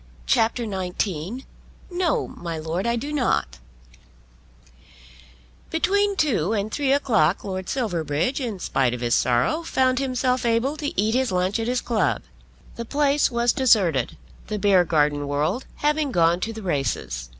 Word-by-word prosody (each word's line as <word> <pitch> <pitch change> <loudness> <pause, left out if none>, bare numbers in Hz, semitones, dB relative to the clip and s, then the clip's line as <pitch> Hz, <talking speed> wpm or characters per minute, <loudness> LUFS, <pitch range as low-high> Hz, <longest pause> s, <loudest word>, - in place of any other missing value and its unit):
CHAPTER 225 - +2
XIX 190 - -3 0.5
"No; 350 -3 0
My 175 -11 -6
Lord, 160 +6 -3
I 235 - +1
Do 285 +6 -4
Not" 145 - 0 2.1
Between 400 +5 +1
two 225 - +1
and 210 0 -2
three 280 -2 0
o'clock 215 - +2
Lord 185 -1 -5
Silverbridge, 175 - -1
in 230 -6 -3
spite 130 -8 0
of 125 - -8
his 120 -1 0
sorrow, 125 - +2
found 260 -5 +1
himself 255 -1 0
able 235 +5 +1
to 290 -10 -3
eat 215 +2 +2
his 255 -3 +1
lunch 185 +4 0
at 225 - -2
his 250 0 0
club. 220 -5 0 0.5
The 235 - -3
place 285 +3 +2
was 235 -1 +1
deserted, 195 - +2 0.3
the 215 - -3
Beargarden 160 -7 +2
world 155 - -1
having 300 -1 0
gone 170 -2 +3
to 225 - -3
the 220 -1 -8
races. 90 - -2
215 Hz, 145 wpm, -23 LUFS, 165-260 Hz, 2.1 s, gone